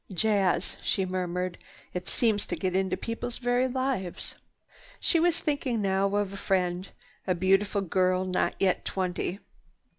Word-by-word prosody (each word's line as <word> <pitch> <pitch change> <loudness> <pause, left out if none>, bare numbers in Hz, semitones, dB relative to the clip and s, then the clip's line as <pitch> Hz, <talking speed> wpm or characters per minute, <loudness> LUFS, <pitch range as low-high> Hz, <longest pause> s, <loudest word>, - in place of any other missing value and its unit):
"Jazz," 195 -1 +1
she 190 - +1
murmured. 180 -1 -2 0.3
"It 180 0 -4
seems 215 -4 +1
to - - -2
get 185 -2 -1
into 190 0 +1
people's 230 +1 -4
very 245 +1 +2
lives." 255 -8 -2 0.7
She 335 - +3
was 340 0 +3
thinking 280 -6 -1
now 195 0 +1
of 205 -1 0
a - - -6
friend, 185 -2 0 0.4
a 185 - +2
beautiful 195 +3 +2
girl 185 0 +2
not 185 -1 0
yet 190 -2 +2
twenty. 185 0 -2
195 Hz, 145 wpm, -28 LUFS, 185-220 Hz, 0.7 s, She